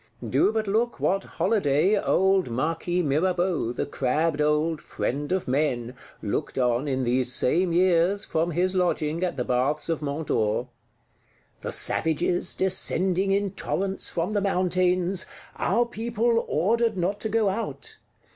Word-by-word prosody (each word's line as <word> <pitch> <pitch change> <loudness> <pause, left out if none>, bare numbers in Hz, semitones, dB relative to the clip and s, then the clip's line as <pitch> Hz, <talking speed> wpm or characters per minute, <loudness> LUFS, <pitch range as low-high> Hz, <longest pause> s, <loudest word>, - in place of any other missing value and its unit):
Do - - +2
but 220 -1 -1
look 225 +4 0
what 195 +1 +1
holiday 185 -1 +1
old 190 -4 +2
Marquis 165 +8 -1
Mirabeau, 175 -2 0
the 120 - -3
crabbed 150 +3 0
old 150 +1 +1
friend 145 +4 -3
of 185 -1 -1
Men, 125 -3 -1 0.3
looked 110 +8 -3
on, 125 +2 +1
in 130 -2 -1
these 125 +1 +1
same 170 +8 +1
years, 180 +2 +3
from 165 +2 -1
his 180 +3 0
lodging, 170 -3 0
at 180 -6 -2
the 125 - 0
Baths 135 +5 0
of 165 -2 -1
Mont 145 +1 -4
d'Or: 110 +3 0 0.9
"The - - -4
savages 170 +3 +1
descending 190 0 +1
in 200 0 +1
torrents 195 0 -2
from 170 +3 -2
the 205 -1 0
mountains; 185 -1 +1 0.3
our 235 +5 +1
people 235 0 -1
ordered 220 +6 +1
not 185 +3 -1
to 220 - -3
go 220 -2 +2
out. 220 +4 -5
175 Hz, 145 wpm, -25 LUFS, 150-195 Hz, 0.9 s, years